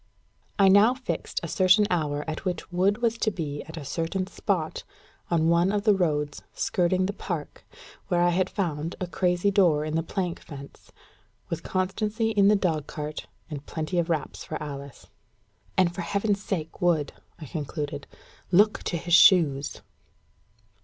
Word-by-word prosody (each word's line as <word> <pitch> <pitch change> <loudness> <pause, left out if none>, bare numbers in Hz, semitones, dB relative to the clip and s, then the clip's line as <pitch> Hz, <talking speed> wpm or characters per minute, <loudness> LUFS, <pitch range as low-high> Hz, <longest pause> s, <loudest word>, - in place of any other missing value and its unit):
I 195 - +6
now 205 +6 +6
fixed 260 -1 -4
a - - -3
certain 185 +2 +4
hour 150 -4 -1
at 155 0 -4
which 180 -2 -4
Wood 200 +6 +1
was 230 0 +1
to - - +2
be 150 -7 -4
at 160 +1 -10
a 145 - -6
certain 165 +6 -2
spot 185 -4 -2 0.5
on 165 -2 +2
one 170 +3 +3
of 205 -1 0
the 210 -1 +5
roads 150 -6 -1
skirting 185 +1 +1
the 200 - -2
park, 170 -6 -5 0.4
where 175 - +1
I 175 0 +4
had 185 +1 +1
found 165 -4 -3
a 185 - -2
crazy 180 +2 +1
door 170 -7 +3
in 155 - -4
the 165 - +2
plank 175 +1 -3
fence 140 -2 -12 0.6
with - - -3
Constancy 210 +4 -1
in 200 -2 +4
the 210 - +6
dogcart, 155 -5 -3 0.2
and 145 -3 -7
plenty 160 +3 -2
of 170 0 -1
wraps 155 -4 -2
for - - -6
Alice. 140 -2 -8 0.7
"And 180 -2 +3
for 175 - -4
Heaven's 200 +2 0
sake, 165 -6 -4
Wood," 165 -5 +2 0.2
I 155 - -9
concluded, 145 0 -5 0.4
"look 205 +3 +4
to 170 - -1
his 175 +1 -3
shoes." 155 -7 +5
175 Hz, 165 wpm, -26 LUFS, 155-195 Hz, 0.7 s, I